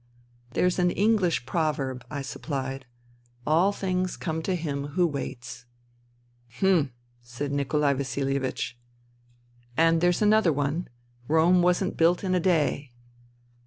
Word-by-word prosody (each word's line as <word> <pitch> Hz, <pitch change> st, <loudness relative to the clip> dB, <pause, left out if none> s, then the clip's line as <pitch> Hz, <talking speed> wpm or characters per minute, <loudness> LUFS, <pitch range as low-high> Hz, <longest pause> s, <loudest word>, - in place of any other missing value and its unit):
" 120 Hz, 0 st, -33 dB
There's 180 Hz, 0 st, +2 dB
an 180 Hz, 0 st, +3 dB
Enghsh 195 Hz, -, +1 dB
proverb," 135 Hz, -4 st, -1 dB
I 145 Hz, -, -4 dB
suppHed: 135 Hz, -1 st, -5 dB, 0.2 s
'' 120 Hz, 0 st, -32 dB
* 120 Hz, 0 st, -33 dB
All 170 Hz, +6 st, +3 dB
things 185 Hz, -2 st, -2 dB
come 160 Hz, -1 st, -3 dB
to 185 Hz, +3 st, -1 dB
him 145 Hz, -4 st, -3 dB
who 180 Hz, -, +5 dB
waits.' 125 Hz, -5 st, -5 dB, 0.3 s
" 120 Hz, 0 st, -37 dB
" 120 Hz, 0 st, -24 dB
Hm! 180 Hz, -8 st, +3 dB, 0.2 s
" 120 Hz, -, -39 dB
said 120 Hz, +4 st, -5 dB
Nikolai 140 Hz, +1 st, +1 dB
Vasihevich, 135 Hz, 0 st, -2 dB, 0.5 s
" 120 Hz, 0 st, -31 dB
And 165 Hz, 0 st, +4 dB
there's 175 Hz, +3 st, +2 dB
another 210 Hz, -4 st, +4 dB
one: 145 Hz, +4 st, -1 dB, 0.2 s
' 120 Hz, -, -37 dB
Rome 165 Hz, +3 st, +4 dB
wasn't 180 Hz, +2 st, +1 dB
built 170 Hz, +3 st, +3 dB
in 185 Hz, -1 st, 0 dB
a 180 Hz, -, +3 dB
day.' 150 Hz, -6 st, +1 dB
145 Hz, 155 wpm, -26 LUFS, 125-175 Hz, 0.5 s, who